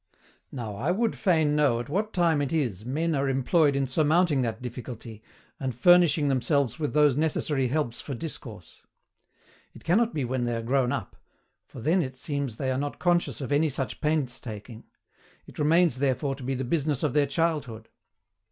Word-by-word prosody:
Now, 115 -6 -5
I 135 +10 -1
would 220 +5 +1
fain 160 -7 +2
know 140 -6 +3
at 120 - -5
what 205 +8 -1
time 165 -4 +2
it 140 - -2
is 125 - -1
men 160 +5 0
are 140 -1 0
employed 140 +3 +2
in 140 0 +1
surmounting 150 +2 +2
that 115 -3 -2
difficulty, 120 -3 -8 0.4
and 130 -4 -3
furnishing 170 +1 +5
themselves 135 0 +1
with 150 -2 -2
those 150 -3 +5
necessary 150 -3 0
helps 130 -3 -2
for 140 - -5
discourse. 115 - -8 0.9
It - - -13
cannot 220 +7 +2
be 145 - -2
when 125 0 -1
they 120 -1 -1
are 115 - -3
grown 125 +1 +1
up, 130 -9 -4 0.5
for 125 - -10
then 165 +8 +2
it 130 -4 -5
seems 140 -3 -3
they 130 +2 -2
are 130 - -1
not 145 0 -3
conscious 175 -3 0
of 135 - -5
any 150 +2 +3
such 135 -4 -4
painstaking; 125 -7 -3 0.6
it - - -13
remains 155 -2 +3
therefore 140 +1 0
to 135 -1 -9
be 135 +1 -2
the 130 - -3
business 145 +1 -1
of 150 - 0
their 145 -1 +3
childhood. 140 -7 -2
140 Hz, 180 wpm, -27 LUFS, 125-155 Hz, 0.9 s, furnishing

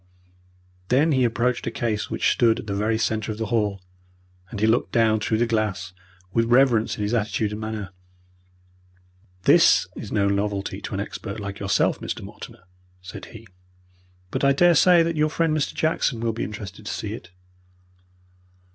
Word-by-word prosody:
Then 145 +6 +3
he 130 -3 +3
approached 120 +1 0
a - - +2
case 110 -3 -2
which - - +1
stood 115 -1 +3
in - - -7
the 100 - -3
very 105 +3 0
centre 110 -1 -1
of 105 - -6
the 110 - -2
hall, 105 -4 0 0.7
and 105 - -6
he 110 - +2
looked 115 +3 +1
down 110 -2 +3
through 110 +1 0
the 120 - +2
glass 105 -5 -2 0.4
with 115 0 +2
reverence 120 -2 +3
in 105 - -3
his 105 +3 -1
attitude 110 -1 0
and 105 +1 -6
manner. 110 -3 -5 1.5
"This - - +5
is - - -8
no 100 -1 +2
novelty 100 0 -2
to - - -5
an - - -2
expert 100 +2 -6
like 100 -1 -6
yourself, 100 -1 +1
Mr. - - -5
Mortimer," - - -11 0.4
said 90 - -9
he; 115 0 -12 0.9
"but 130 - -2
I 140 0 +5
daresay 175 +2 +5
that 165 0 -1
your 155 0 +2
friend, 160 0 0
Mr. 150 - -1
Jackson, 155 -6 0
will 115 0 -1
be 115 - -3
interested 105 0 -8
to - - -2
see 105 0 -4
it." 90 -6 -9
110 Hz, 175 wpm, -24 LUFS, 105-120 Hz, 1.5 s, This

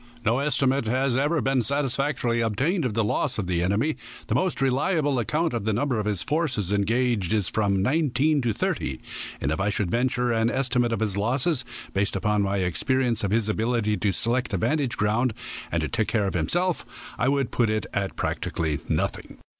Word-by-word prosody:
No 115 +4 +3
estimate 135 -2 +1
has 130 +2 +1
ever 145 +4 +1
been 135 -1 +2
satisfactorily 135 -2 0
obtained 135 - 0
of 110 -4 -2
the 115 - +2
loss 105 - 0
of 105 - -1
the 90 -1 0
enemy. 105 - +1 0.3
The - - -2
most 185 -4 0
reliable 140 +1 +1
account 155 +7 0
of 115 -3 -2
the 110 +1 0
number 120 +1 0
of 105 - -2
his 100 -5 0
forces 135 - 0
engaged 110 -1 +1
is 105 -4 +1
from 100 -3 +1
nineteen 145 +2 +2
to 120 -2 +1
thirty, 65 -9 -2 0.4
and 70 - -1
if 80 - -1
I 100 - +1
should 100 -3 -1
venture 125 0 +1
an 115 0 +2
estimate 125 -2 +1
of 115 - -1
his 100 -3 -1
losses, 130 +6 +1 0.3
based 100 +1 0
upon 105 +2 +1
my 100 0 0
experience 115 - +1
of 100 - +1
his 110 +1 +1
ability 110 0 0
to 105 - +1
select 120 +2 0
a - - +1
vantage 140 - 0
ground, 110 +3 +1 0.4
and 80 -4 -1
take 110 - +1
care 105 -3 +1
of 95 - -1
himself, 175 - -2
I 125 - +2
would 140 -3 0
put 120 -3 +2
it 110 -2 0
at 100 -1 -2
practically 80 -3 -2
nothing. - - -2
120 Hz, 195 wpm, -25 LUFS, 105-135 Hz, 0.4 s, No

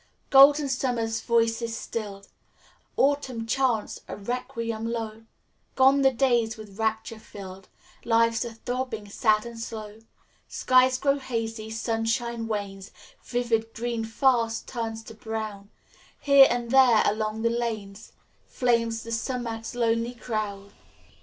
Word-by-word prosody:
"Golden 285 +2 +7
Summer's 240 -4 -1
voice 230 0 +1
is 230 -1 -3
stilled 200 -3 -6 0.7
Autumn 265 -4 +1
chants 235 -2 0
a - - -6
requiem 230 0 -4
low. 225 -1 -5 0.5
Gone 270 +1 +5
the 270 - +6
days 240 -3 +1
with 210 -1 -12
rapture 220 0 -2
filled. 195 -3 -11 0.3
Life's 230 0 +2
a 235 -2 -7
throbbing, 245 -3 -4
sad 215 +1 +2
and 235 -1 -8
slow. 220 -2 -7 0.5
Skies 255 0 +3
grow 280 +1 +1
hazy; 225 -4 -4
sunshine 230 +1 -2
wanes, 200 -3 -4 0.3
Vivid 230 -2 -1
green 235 -1 -2
fast 225 -1 +1
turns 225 -2 -4
to 225 - -11
brown; 215 -3 -6 0.5
Here 280 -1 +7
and 240 -1 -2
there 255 -5 +6
along 215 +1 -1
the 230 - +2
lanes, 220 -3 -4 0.3
Flames 230 -2 0
the 230 - -8
sumac's 230 -1 -3
lonely 230 0 0
crown. 210 -4 -4
230 Hz, 125 wpm, -26 LUFS, 220-245 Hz, 0.7 s, Golden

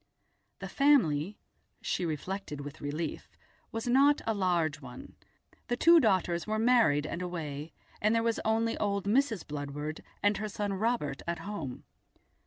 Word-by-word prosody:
The - - -6
family, 205 - +3 0.4
she 175 - -1
reflected 160 -1 -4
with 145 +1 -9
relief, 150 +3 -4 0.4
was 225 0 -4
not 280 +4 +5
a 225 - +1
large 170 -6 0
one; 125 -2 -10 0.5
the 245 - -1
two 335 +5 +7
daughters 185 - +1
were 215 0 0
married 225 -11 +4
and 170 +3 -4
away, 160 -4 -5 0.3
there 225 +2 +3
was 230 -1 0
only 225 +1 +1
old 200 -1 0
Mrs. 225 - +1
Bludward 145 +1 -5 0.2
and 205 0 +3
her 215 0 -3
son 205 0 -2
Robert 195 - -1
at 170 0 -1
home. 165 -7 -6
195 Hz, 145 wpm, -30 LUFS, 155-225 Hz, 0.5 s, two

